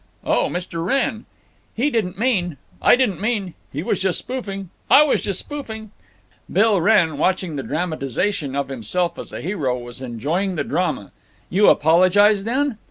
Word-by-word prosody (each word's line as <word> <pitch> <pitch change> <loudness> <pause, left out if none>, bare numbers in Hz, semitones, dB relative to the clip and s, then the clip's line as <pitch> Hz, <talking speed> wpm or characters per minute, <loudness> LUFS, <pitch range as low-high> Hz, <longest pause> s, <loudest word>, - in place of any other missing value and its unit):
"Oh, - - +2
Mr. 175 -2 -4
Wrenn—" 235 0 0 0.5
"He 275 +6 +1
didn't 195 -6 -1
mean—" 190 - 0 0.2
"I - - +6
didn't 245 -8 0
mean—" 210 -5 -1 0.2
"He 145 +4 -4
was - - -1
just 190 -3 +1
spoofing—" 195 -8 -5 0.2
"I 295 - +8
was 300 - +1
just 195 -2 -2
spoofing—" 220 -8 -7 0.6
Bill 210 -3 +3
Wrenn, 170 -7 +3
watching 185 -2 0
the 140 - -2
dramatization 155 - -2
of 140 0 -2
himself 155 - -2
as - - -7
hero, 150 -9 -2
was 120 +1 -9
enjoying 150 - -2
the 150 - -1
drama. 155 - -2 0.4
"You 200 +3 +4
apologize, 190 +6 +5
then?" 260 0 0
185 Hz, 155 wpm, -21 LUFS, 155-215 Hz, 0.6 s, I